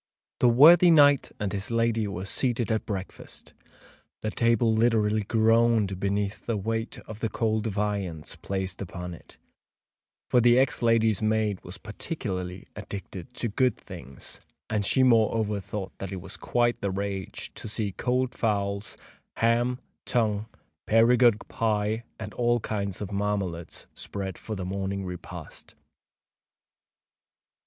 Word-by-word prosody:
The 125 Hz, -, +5 dB
worthy 165 Hz, +9 st, +8 dB
knight 145 Hz, -4 st, +5 dB
and 100 Hz, -1 st, -2 dB
his 100 Hz, 0 st, -3 dB
lady 115 Hz, -2 st, +1 dB
were 95 Hz, -1 st, -5 dB
seated 120 Hz, +2 st, 0 dB
at 110 Hz, -, -1 dB
breakfast. 95 Hz, -3 st, -7 dB, 0.7 s
The 110 Hz, -, -1 dB
table 115 Hz, -1 st, +2 dB
literally 110 Hz, -2 st, +2 dB
groaned 110 Hz, -2 st, +2 dB
beneath 100 Hz, +1 st, -2 dB
the 115 Hz, -2 st, 0 dB
weight 110 Hz, +3 st, -3 dB
of 110 Hz, -1 st, -9 dB
the 115 Hz, -, -1 dB
cold 110 Hz, -1 st, 0 dB
viands 100 Hz, -6 st, -3 dB
placed 95 Hz, -1 st, -4 dB
upon 90 Hz, -1 st, -6 dB
it; 85 Hz, -, -15 dB, 0.9 s
for 125 Hz, -, +4 dB
the 120 Hz, +1 st, +5 dB
ex 130 Hz, -1 st, +2 dB
lady's 115 Hz, -3 st, +3 dB
maid 110 Hz, -2 st, 0 dB
was 90 Hz, +3 st, -9 dB
particularly 95 Hz, -, -5 dB
addicted 100 Hz, +2 st, -8 dB
to 120 Hz, -, -2 dB
good 125 Hz, +1 st, +1 dB
things, 80 Hz, -8 st, -10 dB, 0.3 s
and 105 Hz, -1 st, +1 dB
she 130 Hz, +6 st, +3 dB
moreover 110 Hz, -3 st, +3 dB
thought 95 Hz, 0 st, -6 dB
that 95 Hz, -1 st, -5 dB
it 95 Hz, -, -4 dB
was 95 Hz, -, -8 dB
"quite 120 Hz, -1 st, 0 dB
the 100 Hz, -, 0 dB
rage" 95 Hz, 0 st, -4 dB
to -, -, -8 dB
see 105 Hz, -1 st, -2 dB
cold 125 Hz, +5 st, -1 dB
fowls, 100 Hz, -2 st, -1 dB, 0.4 s
ham, 120 Hz, +2 st, +2 dB, 0.3 s
tongue, 110 Hz, -3 st, 0 dB, 0.4 s
Perigord 115 Hz, 0 st, +4 dB
pie, 110 Hz, 0 st, 0 dB, 0.2 s
and 105 Hz, -2 st, -6 dB
all 120 Hz, 0 st, +2 dB
kinds 100 Hz, -3 st, -3 dB
of 105 Hz, -, -7 dB
marmalades 100 Hz, -4 st, -3 dB
spread 95 Hz, -2 st, -6 dB
for 110 Hz, -, -5 dB
the 95 Hz, -2 st, -4 dB
morning 95 Hz, +1 st, -3 dB
repast. 90 Hz, -1 st, -8 dB
105 Hz, 135 wpm, -27 LUFS, 100-115 Hz, 0.9 s, worthy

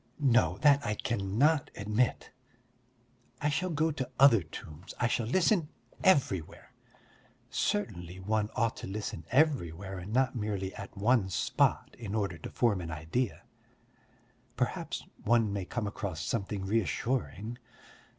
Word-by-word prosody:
No, 115 Hz, -, +3 dB
that 140 Hz, -1 st, +5 dB
I 105 Hz, -, -1 dB
cannot 120 Hz, +9 st, +1 dB
admit. 105 Hz, +4 st, 0 dB, 1.1 s
I 150 Hz, -, +1 dB
shall 180 Hz, +6 st, 0 dB
go 160 Hz, 0 st, +1 dB
to 135 Hz, -4 st, -4 dB
other 130 Hz, -6 st, +7 dB
tombs, 80 Hz, +1 st, -10 dB
I 120 Hz, -, +2 dB
shall 115 Hz, -1 st, 0 dB
listen 170 Hz, -, +2 dB, 0.3 s
everywhere. 120 Hz, -, +1 dB, 0.8 s
Certainly 95 Hz, -4 st, -2 dB
one 105 Hz, +2 st, 0 dB
ought 115 Hz, -1 st, +1 dB
to -, -, -6 dB
listen 105 Hz, +2 st, -5 dB
everywhere 100 Hz, -, +1 dB
and 90 Hz, +3 st, -7 dB
not 130 Hz, +2 st, +2 dB
merely 100 Hz, -4 st, -2 dB
at 100 Hz, -, -9 dB
one 105 Hz, -1 st, +3 dB
spot 90 Hz, -, +1 dB
in 110 Hz, -3 st, -4 dB
order 100 Hz, -6 st, -1 dB
to -, -, -7 dB
form 105 Hz, -6 st, +1 dB
an 85 Hz, -, -6 dB
idea. 80 Hz, +10 st, -2 dB, 1.1 s
Perhaps -, -, -2 dB, 0.2 s
one 115 Hz, -2 st, +3 dB
may 100 Hz, -2 st, -2 dB
come 120 Hz, +2 st, -3 dB
across 100 Hz, -5 st, -4 dB
something 100 Hz, 0 st, -2 dB
reassuring. 115 Hz, -, -1 dB
110 Hz, 130 wpm, -31 LUFS, 95-130 Hz, 1.1 s, other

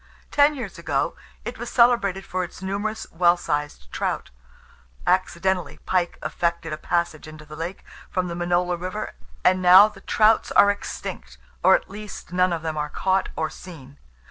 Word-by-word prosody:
Ten 290 Hz, +1 st, +4 dB
years 235 Hz, -7 st, -6 dB
ago -, -, -1 dB, 0.3 s
it -, -, -6 dB
was -, -, -5 dB
celebrated 235 Hz, -6 st, +3 dB
for 185 Hz, 0 st, -2 dB
its 180 Hz, +1 st, -9 dB
numerous 205 Hz, +3 st, -3 dB
well 175 Hz, +1 st, +4 dB
sized 145 Hz, -, -3 dB
trouts. -, -, -3 dB, 0.7 s
Accidentally 185 Hz, 0 st, 0 dB
pike 180 Hz, -2 st, 0 dB
effected 170 Hz, -2 st, -2 dB
a -, -, -3 dB
passage 170 Hz, -2 st, -2 dB
into 155 Hz, 0 st, -11 dB
the 150 Hz, 0 st, -10 dB
lake 170 Hz, +4 st, -6 dB, 0.2 s
from 185 Hz, -1 st, -1 dB
the 170 Hz, -, -4 dB
Minola 175 Hz, +1 st, 0 dB
river, 185 Hz, +4 st, -4 dB, 0.3 s
and 185 Hz, 0 st, +4 dB
now 185 Hz, +3 st, +9 dB
the 210 Hz, -2 st, -13 dB
trouts 220 Hz, 0 st, +3 dB
are 205 Hz, -, +7 dB
extinct, 205 Hz, -, -7 dB, 0.2 s
or, -, -, +7 dB
at -, -, -2 dB
least, 210 Hz, -3 st, -9 dB
none 180 Hz, 0 st, +3 dB
of 165 Hz, -2 st, -2 dB
them 160 Hz, -1 st, -3 dB
are 150 Hz, 0 st, -2 dB
caught 190 Hz, +4 st, 0 dB
or 160 Hz, -1 st, -2 dB
seen. 145 Hz, -6 st, -12 dB
180 Hz, 170 wpm, -24 LUFS, 170-195 Hz, 0.7 s, now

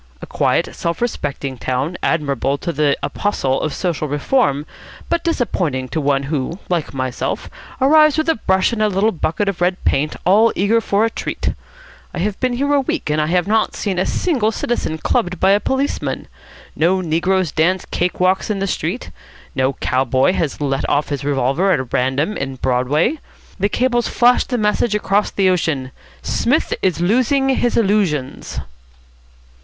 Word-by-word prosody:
A -, -, -8 dB
quiet, -, -, 0 dB
self 170 Hz, 0 st, -2 dB
respecting 140 Hz, -, -3 dB
town, 130 Hz, +7 st, -2 dB
admirable 140 Hz, -3 st, 0 dB
to 170 Hz, -, -4 dB
the 145 Hz, -1 st, +2 dB
apostle 135 Hz, -10 st, -1 dB
of 155 Hz, -, -1 dB
social 165 Hz, -3 st, -2 dB
reform, 145 Hz, -, +1 dB, 0.4 s
but 340 Hz, 0 st, 0 dB
disappointing 175 Hz, -, -1 dB
to 160 Hz, -, -2 dB
one 140 Hz, -1 st, +1 dB
who, 145 Hz, +3 st, -3 dB
like 170 Hz, -4 st, -1 dB
myself, 130 Hz, -2 st, -3 dB, 0.3 s
arrives 305 Hz, +2 st, +5 dB
with 315 Hz, +1 st, 0 dB
a 325 Hz, -, +4 dB
brush 190 Hz, -2 st, +1 dB
and 220 Hz, -, -2 dB
a 215 Hz, -, +4 dB
little 200 Hz, +3 st, +2 dB
bucket 170 Hz, +3 st, -1 dB
of 195 Hz, -3 st, -2 dB
red 180 Hz, +1 st, +2 dB
paint, 150 Hz, +3 st, +1 dB
all 215 Hz, +5 st, +5 dB
eager 215 Hz, +5 st, +2 dB
for 205 Hz, 0 st, +1 dB
a 225 Hz, -, -1 dB
treat. -, -, -3 dB, 0.6 s
I -, -, -5 dB
have 200 Hz, +3 st, -2 dB
been 255 Hz, -1 st, 0 dB
here 280 Hz, +4 st, 0 dB
a 285 Hz, -, +4 dB
week, 205 Hz, -, -2 dB
and 155 Hz, +1 st, +1 dB
I 150 Hz, -, 0 dB
have 175 Hz, +1 st, +1 dB
not 220 Hz, +1 st, +1 dB
seen 190 Hz, -4 st, -2 dB
a 185 Hz, -, 0 dB
single 250 Hz, -, +1 dB
citizen 225 Hz, -8 st, -2 dB
clubbed 175 Hz, +2 st, -1 dB
by 190 Hz, -, +4 dB
a 200 Hz, -, +4 dB
policeman. 265 Hz, +5 st, -2 dB, 0.5 s
No 180 Hz, +4 st, +2 dB
negroes 180 Hz, +1 st, 0 dB
dance 180 Hz, +3 st, +1 dB
cake 180 Hz, +1 st, -2 dB
walks 185 Hz, +4 st, +2 dB
in 210 Hz, -, 0 dB
the 195 Hz, -, -1 dB
street. 185 Hz, +4 st, -3 dB, 0.4 s
No 130 Hz, +1 st, +1 dB
cow 130 Hz, 0 st, 0 dB
boy 130 Hz, +6 st, +2 dB
has 160 Hz, -6 st, -2 dB
let 140 Hz, -1 st, -1 dB
off 145 Hz, -, +1 dB
his 140 Hz, -3 st, -3 dB
revolver 140 Hz, +7 st, +1 dB
at 130 Hz, -7 st, -1 dB
random 130 Hz, +10 st, 0 dB
in 135 Hz, -1 st, -4 dB
Broadway. 130 Hz, -, +1 dB, 0.4 s
The 200 Hz, +2 st, +1 dB
cables 240 Hz, +1 st, +1 dB
flash 245 Hz, +1 st, +3 dB
the 250 Hz, -, -2 dB
message 210 Hz, 0 st, +1 dB
across 205 Hz, 0 st, +1 dB
the 195 Hz, -1 st, +1 dB
ocean, 160 Hz, -8 st, 0 dB, 0.3 s
'Psmith 260 Hz, +7 st, +1 dB
is 185 Hz, -3 st, 0 dB
losing 255 Hz, +8 st, +2 dB
his 245 Hz, -2 st, +1 dB
illusions.'" 195 Hz, -, 0 dB
180 Hz, 175 wpm, -19 LUFS, 145-220 Hz, 0.6 s, arrives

